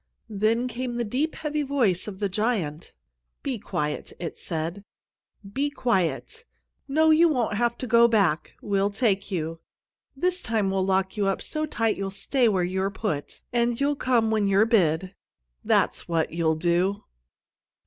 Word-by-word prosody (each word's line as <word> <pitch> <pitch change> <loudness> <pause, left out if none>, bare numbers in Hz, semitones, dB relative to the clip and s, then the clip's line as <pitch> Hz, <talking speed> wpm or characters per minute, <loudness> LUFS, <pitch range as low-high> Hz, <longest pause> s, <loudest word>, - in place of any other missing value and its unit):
Then 220 +4 +1
came 245 0 -4
the 240 - 0
deep, 265 +9 -1
heavy 300 -1 -2
voice 250 -11 +1
of 200 -2 -6
the 200 0 0
giant: 190 -7 -2 0.5
"Be 260 -5 -2
quiet!" 150 -7 -3
it 170 -2 -5
said. 165 +3 -4 0.7
"Be 285 +4 0
quiet! 240 - -1 0.4
No, 315 +3 +4
you 330 +2 +6
won't 250 -8 0
have 235 +1 +1
to - - -4
go 235 0 +6
back. 200 -9 +1
We'll 200 -1 +1
take 200 -2 0
you. 165 -3 -3 0.6
This 360 +4 0
time 215 -4 0
we'll 190 -1 +1
lock 190 +2 0
you 200 -1 +1
up 195 - 0
so 310 0 -3
tight 225 -6 0
you'll 195 0 -2
stay 230 +5 +1
where 190 -4 +1
you're 190 +2 -1
put, 190 -7 -4
and 235 0 +1
you'll 285 +1 +1
come 235 -5 +1
when 215 -2 +2
you're 200 +2 +4
bid. 185 -4 +2 0.5
That's - - +1
what 165 -2 0
you'll 165 -1 +1
do!" 180 +5 +1
210 Hz, 160 wpm, -25 LUFS, 190-245 Hz, 0.7 s, you